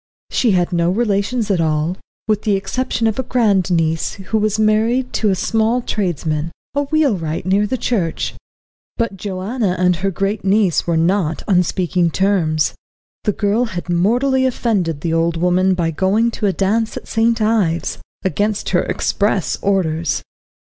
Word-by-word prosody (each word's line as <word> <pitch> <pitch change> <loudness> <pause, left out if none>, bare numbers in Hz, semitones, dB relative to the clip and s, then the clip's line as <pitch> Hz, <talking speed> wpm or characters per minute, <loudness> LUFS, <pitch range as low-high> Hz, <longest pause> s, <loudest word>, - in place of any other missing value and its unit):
She 230 -5 +2
had 180 0 +1
no 170 0 +2
relations 210 +2 0
at 180 -4 +2
all, 155 +2 0 0.3
with 215 -1 +1
the 210 -3 +1
exception 230 +5 -2
of 220 +2 0
a - - +3
grand 215 -8 +1
niece, 165 -2 0
who 200 +3 -2
was 215 0 0
married 220 +4 +1
to 215 - +1
a 190 - +2
small 225 +5 +1
tradesman, 165 -6 -2 0.2
a 285 0 0
wheelwright 215 - 0
near 200 +3 +2
the 255 - -1
church. 190 -10 -1 0.6
But 230 -4 -1
Joanna 195 +2 -2
and 180 -1 +2
her 195 +4 0
great 195 +3 -2
niece 195 -3 +2
were 170 -1 +1
not 165 -1 +1
on 185 -4 +4
speaking 180 -1 0
terms. 160 - +1 0.5
The 210 - +3
girl 210 +5 +1
had 175 -5 -6
mortally 250 +9 +2
offended 195 - -1
the 165 +1 -1
old 165 0 +1
woman 180 +2 +2
by 165 -2 0
going 200 +8 +1
to 215 - -1
a - - +3
dance 215 +4 0
at - - -9
St. 230 +1 +1
Ives, 210 -7 0 0.3
against 205 +4 0
her 175 - +2
express 200 -2 0
orders. 170 -5 0
195 Hz, 165 wpm, -18 LUFS, 175-220 Hz, 0.6 s, on